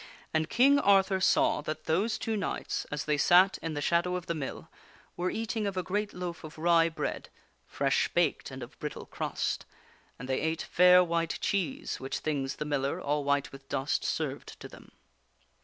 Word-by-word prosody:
And 160 0 +1
King 275 +4 +5
Arthur 195 -2 +4
saw 180 - +3
that 155 +1 -5
those 195 +8 +1
two 225 - -2
knights, 200 - -3
as 150 -1 -4
they 150 -1 +1
sat 180 +5 +5
in 165 -2 -4
the 145 - -2
shadow 175 +3 +1
of 180 - -4
the 170 - -2
mill, 150 -5 -5 0.5
were 180 +1 -1
eating 225 -1 -2
of 195 -2 -4
a 185 - 0
great 205 +3 -2
loaf 180 -2 -6
of 155 0 -10
rye 165 0 +4
bread, 160 - -4 0.4
fresh - - +1
baked - - 0
and - - -7
of - - -12
brittle - - -5
crust; - - -3 0.5
and 125 - -8
they 130 0 0
ate 160 0 -1
fair 180 0 +6
white 170 -1 -1
cheese, 265 - -2
which 135 - -3
things 140 -3 -2
the 150 - -4
miller, 140 -2 -1
all 145 +1 -1
white 140 0 0
with 135 0 -13
dust, 135 +2 -1
served - - -3
to - - -8
them. - - -15
170 Hz, 190 wpm, -29 LUFS, 150-190 Hz, 0.5 s, fair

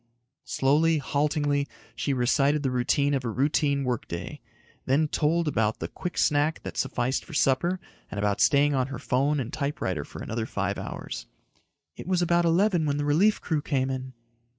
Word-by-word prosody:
Slowly, 155 +4 +2
haltingly, 145 0 0 0.3
she 145 - -1
recited 135 +3 +2
the 135 - 0
routine 140 +3 +1
of 135 -2 0
a 120 - -2
routine 140 +3 +1
work 125 -3 -2
day, 85 0 -6 0.5
then 145 +4 +3
told 160 +3 +1
about 110 -6 +1
the - - -4
quick 180 -1 -6
snack 150 +1 +2
that - - -6
sufficed 130 0 -1
for 165 - -10
supper 170 +8 +2 0.3
and - - -7
about 100 0 0
staying 145 0 +4
on 130 -2 +1
her 135 -2 -6
phone 140 +5 +1
and 125 -3 -4
typewriter 140 - -2
for - - -9
another 115 0 -3
five - - -2
hours. - - -6 0.7
"It - - -9
was 180 -1 +2
about 175 0 +3
eleven 175 -1 +3
when 145 0 0
the 145 - -1
relief 180 +9 +3
crew 155 -3 -1
came 135 -3 0
in." 130 0 -5
145 Hz, 175 wpm, -27 LUFS, 130-155 Hz, 0.7 s, staying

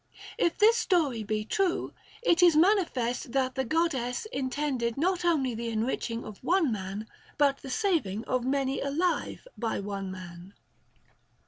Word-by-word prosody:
If 340 - +2
this 450 +3 +5
story 310 - +1
be 215 0 -2
true, 370 - 0 0.3
it 350 -6 +4
is 345 -3 +6
manifest 305 - +2
that 260 -1 +1
the 265 - -1
God 325 +6 +1
dess 250 - -3
intended 260 -3 -1
not 360 +4 +1
only 295 -8 +2
the 230 +1 -4
enriching 230 +1 -2
of 210 -2 -10
one 345 -6 +2
man, 200 0 -4 0.3
but 280 -2 +3
the 270 - -9
saving 295 - 0
of 255 -1 0
many 270 +1 0
alive 330 - -1
by 230 -2 -1
one 195 -1 -4
man. 185 0 -10
265 Hz, 150 wpm, -28 LUFS, 225-335 Hz, 0.3 s, is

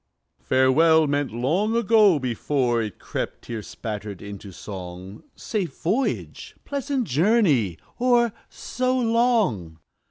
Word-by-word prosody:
"Farewell," 155 +5 +4
meant 145 -2 -1
long 165 - 0
ago, 215 -5 +5
before 125 -1 0
It 105 -3 -5
crept, - - -5
tear 115 -2 -5
spattered, 105 -2 -6
into 100 0 -9
song, 95 0 -9
"Safe 200 -6 -4
voyage!" 225 +11 -2
"Pleasant 275 -1 -2
journey!" 145 - +2 0.2
or 240 -2 +3 0.2
"So 255 0 -2
long!" 225 - +1
145 Hz, 105 wpm, -24 LUFS, -, 0.2 s, ago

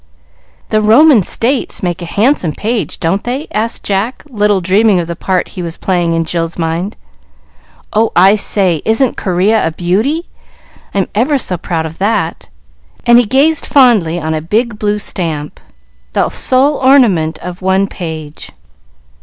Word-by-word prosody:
"The 215 - +1
Roman 235 +4 +5
States 240 +7 -1
make 175 -1 -2
a - - -5
handsome 205 - +1
page, 225 +5 -3
don't 185 +4 -1
they?" 260 +5 -3
asked 225 +2 -2
Jack, 205 +5 -2
little 210 -3 +1
dreaming 195 +2 +2
of 170 - -2
the 170 - -4
part 185 +2 -1
he 185 - -7
was 170 -1 -6
playing 175 -3 0
in 165 0 0
Jill's 165 0 -3
mind. 170 +4 -3 1.0
"Oh, 220 +1 +2
I 190 +3 +6
say, 190 -6 +1
isn't 225 +3 +1
Corea 195 +4 +1
a - - +1
beauty? 210 - -1 0.7
I'm 195 -2 +1
ever 260 +7 +1
so 190 -7 -2
proud 165 -2 -3
of 160 +1 -8
that;" 190 - -1 0.6
and 240 0 +6
he 245 - +2
gazed 285 +6 +2
fondly 215 - +3
on 160 -1 -3
a 155 - -2
big 210 +6 -1
blue 210 0 0
stamp, 160 -7 -4 0.5
the - - +1
sole 270 +3 +2
ornament 230 - +3
of 180 +1 -8
one 190 +1 +2
page. 160 -6 -7
195 Hz, 155 wpm, -13 LUFS, 170-230 Hz, 1.0 s, I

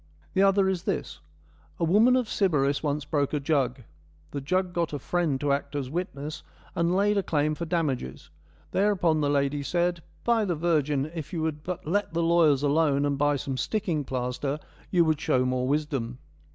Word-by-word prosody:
The 190 - +2
other 195 0 +4
is 190 -2 0
this: 75 -2 -3 0.6
A - - 0
woman 215 +9 +5
of 250 -3 +1
Sybaris 145 -10 +1
once 150 -1 -1
broke 145 -1 0
a 150 - +1
jug. 135 -3 0 0.5
The 140 - -4
jug 180 +5 0
got 170 -3 -1
a - - -1
friend 155 -1 -1
to 145 0 +1
act 140 +1 -3
as 135 -2 -3
witness, 155 -3 -4 0.3
and 170 +1 +1
laid 205 +1 +3
a - - +2
claim 155 -4 0
for 170 +3 -4
damages. 145 - -2 0.4
Thereupon 180 -6 +2
the 145 - +1
lady 140 0 +1
said: 175 +3 0
' - - -32
By 235 -2 +3
the 180 -4 0
virgin, 150 -3 0
if 160 -4 -6
you 165 -2 -1
would 155 -2 -2
but 180 +2 -5
let 185 +1 -1
the 170 - +1
lawyers 165 -5 +4
alone 145 -1 +2
and 145 -1 +1
buy 145 +1 +2
some 135 -1 -3
sticking 170 -4 -1
plaster 130 +2 -2 0.3
you 175 -3 +4
would 155 -2 +1
show 140 -6 +2
more 125 0 0
wisdom.' 135 -5 -1
155 Hz, 190 wpm, -27 LUFS, 140-175 Hz, 0.6 s, woman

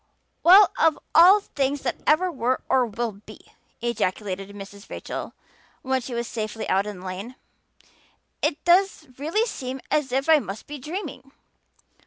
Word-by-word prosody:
"Well, 375 +2 +8
of 320 -2 +4 0.2
all 370 +5 +8
things 280 -5 -2
that 245 - -2
ever 360 +4 +3
were 255 -3 -1
or 255 -2 +3
will 230 +1 -3 0.2
be!" - - -11 0.4
ejaculated 195 -4 -2
Mrs. 200 +1 -11
Rachel - - -6 0.5
when 265 0 0
she 245 0 -6
was 235 0 -2
safely 220 -1 -4
out 195 +2 +1
in 200 -3 -7
the - - -11
lane. 195 +7 -6 1.1
"It 295 - -1
does 360 -1 +3
really 335 +10 0
seem 265 - -5
as 295 -4 +1
if 270 +3 0
I 320 -1 +6
must 200 -4 -7
be 295 0 -8
dreaming. 300 -3 -7
260 Hz, 155 wpm, -24 LUFS, 215-315 Hz, 1.1 s, Well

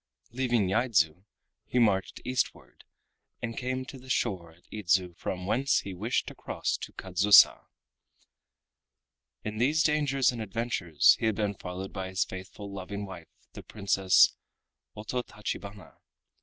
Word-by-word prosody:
Leaving 120 -4 +1
Yaidzu 95 -5 +1 0.4
he - - -2
marched 100 -5 +2
eastward, 125 0 -3 0.5
and 115 -1 -4
came 130 +2 -3
to 135 0 -10
the 130 +1 -15
shore 95 -10 -1
at 85 +2 -24
Idzu 95 -3 +1
from 90 +2 -5
whence 130 +7 +2
he 100 - -7
wished 110 +7 -1
to - - -8
cross - - -3
to - - -8
Kadzusa. 95 +2 +5 1.8
In 105 0 -5
these 150 +6 +3
dangers 140 -4 +2
and 120 -2 -6
adventures 100 -6 +2
he 110 - +1
had 110 - +1
been 105 -1 -1
followed 95 0 -7
by 95 0 -4
his 95 0 0
faithful 95 +2 -9
loving 100 +1 -5
wife 90 -4 -10 0.3
the - - -8
Princess 95 -2 +3 0.6
Ototachibana. 105 -4 -6
100 Hz, 135 wpm, -29 LUFS, 95-120 Hz, 1.8 s, Kadzusa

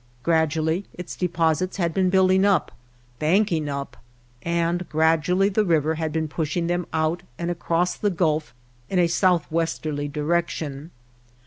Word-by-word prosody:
Gradually 160 +2 +1
its 180 - -7
deposits 170 0 0
had 170 -3 0
been 185 0 +2
building 190 0 +4
up, 200 -6 +2 0.5
banking 165 -2 +2
up; 140 0 -5 0.4
and 170 +1 -1
grad 160 +1 +3
ually 195 +2 +2
the 215 - +3
river 160 -4 +2
had 160 -1 -3
been 160 0 -1
pushing 160 +2 -2
them 175 0 -1
out 160 +2 0 0.2
and 170 0 -2
across 175 +1 0
the 205 - +1
Gulf 155 -7 0 0.4
in 190 - -1
a 175 - +5
southwesterly 165 -4 0
direction. 150 -1 -2
165 Hz, 140 wpm, -24 LUFS, 155-180 Hz, 0.5 s, a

